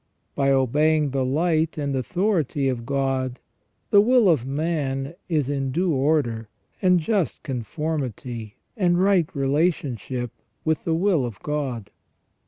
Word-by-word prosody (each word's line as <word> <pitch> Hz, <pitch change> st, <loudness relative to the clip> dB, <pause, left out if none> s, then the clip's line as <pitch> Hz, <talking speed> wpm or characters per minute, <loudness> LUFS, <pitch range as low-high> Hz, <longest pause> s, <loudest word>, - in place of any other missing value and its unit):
By 140 Hz, -1 st, +1 dB
obeying 145 Hz, +3 st, +2 dB
the 135 Hz, -1 st, 0 dB
light 160 Hz, +4 st, +1 dB
and 140 Hz, -2 st, -1 dB
authority 155 Hz, -, 0 dB
of 120 Hz, -3 st, -2 dB
God 135 Hz, -2 st, -1 dB, 0.5 s
the 200 Hz, -, +7 dB
will 235 Hz, -2 st, +4 dB
of 140 Hz, -7 st, +2 dB
man 140 Hz, -2 st, -2 dB, 0.2 s
is 150 Hz, -6 st, +1 dB
in 135 Hz, -2 st, -1 dB
due 175 Hz, +4 st, +1 dB
order, 130 Hz, -6 st, 0 dB, 0.3 s
and 180 Hz, -2 st, +4 dB
just 190 Hz, +1 st, -1 dB
confor 150 Hz, +4 st, -3 dB
mity, 120 Hz, -4 st, -6 dB, 0.2 s
and 175 Hz, -5 st, +2 dB
right 185 Hz, -4 st, +3 dB
relationship 135 Hz, -, -1 dB, 0.3 s
with 160 Hz, +2 st, 0 dB
the 165 Hz, -2 st, +1 dB
will 175 Hz, -4 st, +2 dB
of 120 Hz, -5 st, -5 dB
God. 135 Hz, -8 st, -3 dB
145 Hz, 135 wpm, -24 LUFS, 130-165 Hz, 0.5 s, the